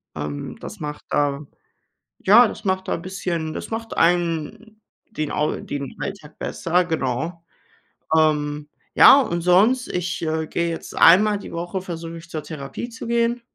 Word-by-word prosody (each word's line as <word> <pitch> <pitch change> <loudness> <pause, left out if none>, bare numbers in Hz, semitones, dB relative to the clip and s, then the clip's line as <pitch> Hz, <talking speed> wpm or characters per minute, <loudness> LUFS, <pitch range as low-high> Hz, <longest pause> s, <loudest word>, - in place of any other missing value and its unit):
Ähm, 75 -1 -5
das - - -9
macht 150 -1 -6
da 145 0 0 0.7
ja, 225 +4 +7
das 215 - -8
macht 190 0 -1
da - - 0
'n 170 - -7
bisschen 170 -4 -3
das - - -6
macht 225 0 -5
einem 175 +6 0 0.3
den 155 -1 -4
Au 150 +1 0
den 140 -2 -6
Alltag 175 -7 -7
besser, 175 +2 0
genau. 160 +2 -2 0.7
Ähm. 150 -1 +1 0.3
Ja, 280 - +8
und 170 -8 -2
sonst, 210 +9 +4
ich, 180 0 -3
äh, 160 -1 -1
gehe 170 0 -1
jetzt 165 - -6
einmal 205 +4 +6
die - - -10
Woche 175 +2 -4
versuche 165 -2 -7
ich, 165 +1 -13
zur 155 -3 -5
Therapie 150 - -7
zu 230 0 -8
gehen. 235 0 +1
170 Hz, 160 wpm, -22 LUFS, 155-195 Hz, 0.7 s, Ja